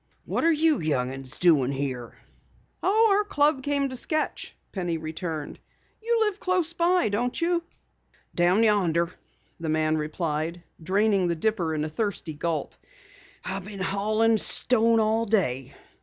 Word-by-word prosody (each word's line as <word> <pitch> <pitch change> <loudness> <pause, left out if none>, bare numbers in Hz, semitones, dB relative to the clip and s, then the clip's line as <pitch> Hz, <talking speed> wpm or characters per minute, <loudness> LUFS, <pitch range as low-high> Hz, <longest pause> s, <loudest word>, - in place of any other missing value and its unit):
"What - - -1
are 335 - +5
you 315 -1 +3
young 130 -5 -1
'uns 135 -1 -5
doing 150 -7 +4
here?" 130 -4 -4 0.6
"Oh, 440 +3 +4
our 415 - +2
club 295 -8 +1
came 280 0 0
to 260 - -6
sketch," 310 +5 -3 0.2
Penny 175 -4 -2
returned. 160 -1 -5 0.4
"You 470 +1 +1
live 420 -2 0
close 365 -3 0
by, 345 -1 +2
don't 240 +5 -1
you?" 340 0 +1 0.7
"Down 180 +5 +3
yonder," 175 -6 +2 0.5
the 165 -1 -4
man 155 0 +1
replied, 155 +2 -3 0.2
draining 195 +2 +2
the 170 - 0
dipper 170 -3 0
in 150 - -1
a - - -2
thirsty 185 -2 -3
gulp. 155 -1 -3 0.7
"I 195 - -3
been 200 +1 -9
haulin' 215 +3 +1
stone 230 -1 +3
all 220 +1 +1
day. 135 - 0
195 Hz, 145 wpm, -26 LUFS, 160-265 Hz, 0.7 s, are